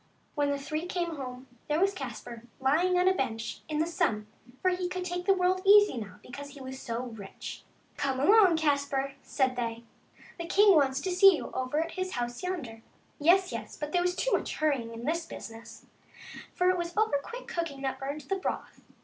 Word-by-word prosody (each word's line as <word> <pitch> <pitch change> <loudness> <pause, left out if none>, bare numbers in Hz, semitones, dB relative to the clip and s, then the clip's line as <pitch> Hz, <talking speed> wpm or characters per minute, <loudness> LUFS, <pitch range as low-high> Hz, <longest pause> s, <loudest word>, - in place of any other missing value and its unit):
When 290 -2 +1
the 285 - 0
three 310 +4 -4
came 345 -2 -2
home, 255 -1 -7 0.2
there 300 +1 +1
was 390 +2 +3
Caspar 240 - -7 0.2
lying 330 +8 +3
on 360 +1 +3
a 375 - +6
bench 225 -9 -3
in 305 - -1
the 315 - +2
sun, 215 -10 0 0.3
for 370 - +2
he 360 0 -2
could 365 0 -4
take 355 0 -3
the 390 - +7
world 370 0 +2
easy 410 -4 +7
now, 210 -6 -6
because 285 +3 -8
he - - -10
was 265 0 -7
so 235 0 -3
rich. 220 -6 -8 0.2
" - - -35
Come 270 -2 -1
along, 380 +2 +6
Caspar," 280 -3 0
said 260 -2 0
they, 230 -1 -3 0.3
" - - -22
the 340 - -4
king 405 +3 +6
wants 275 -2 +3
to 375 - -2
see 375 +1 +7
you - - -6
over 260 +4 -1
at 330 - -7
his 370 0 -3
house 240 0 -3
yonder." 295 -12 -4 0.4
Yes, 360 +5 +4
yes, 220 -2 -6
but 295 0 -4
there 355 - +2
was 360 0 0
too - - 0
much - - 0
hurrying 275 -7 0
in 230 +1 -7
this 330 +2 -1
business, 230 -4 -10 0.7
for 360 0 +4
it 365 - -1
was 345 +1 -4
over 430 -10 +3
quick - - -8
cooking 325 -6 -3
that 265 - -2
burned 280 +3 -4
the 385 +8 -2
broth. 380 - -4
295 Hz, 210 wpm, -29 LUFS, 260-360 Hz, 0.7 s, the